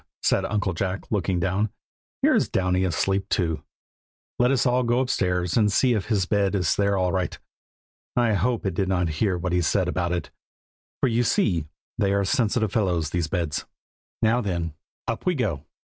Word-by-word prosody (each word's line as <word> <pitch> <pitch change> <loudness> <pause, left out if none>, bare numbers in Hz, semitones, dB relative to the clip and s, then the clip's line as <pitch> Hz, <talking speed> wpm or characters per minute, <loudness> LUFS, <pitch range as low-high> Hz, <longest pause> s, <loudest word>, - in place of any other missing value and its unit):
said - - +2
Uncle 105 -3 -1
Jack, 95 +3 -3
looking 95 -3 0
down. 95 +5 0 0.5
"Here - - +5
is - - +2
Downy 90 0 +1
asleep 95 +2 0
too. 80 -4 0 0.8
Let 125 0 +4
us 135 -1 +2
go 125 -1 +2
upstairs 90 -8 0
and 105 -3 +3
see 125 +6 +3
if 105 -4 -1
his 105 -5 +1
bed 100 0 +1
is 90 -4 +1
there 100 -1 +2
all 90 -1 +1
right. 95 -2 -1 0.8
I 120 -3 +3
hope 110 +4 0
it 95 - 0
did 95 +2 0
not 90 -3 +1
hear 95 -4 +2
what 90 0 -2
he 90 - +3
said 90 +2 +1
about 90 -1 -1
it, 85 -4 -3 0.7
for - - +4
you 120 0 +2
see 90 -8 +1 0.3
they 100 -2 +2
are 100 0 +1
sensitive 110 0 +1
fellows, 90 -8 0
these 85 -3 0
beds. 80 -3 -2 0.6
Now 115 +3 +3
then, 85 -6 -2 0.3
up 115 +9 -3
we 180 - +3
go! 85 - -2
95 Hz, 180 wpm, -25 LUFS, 90-110 Hz, 0.8 s, Here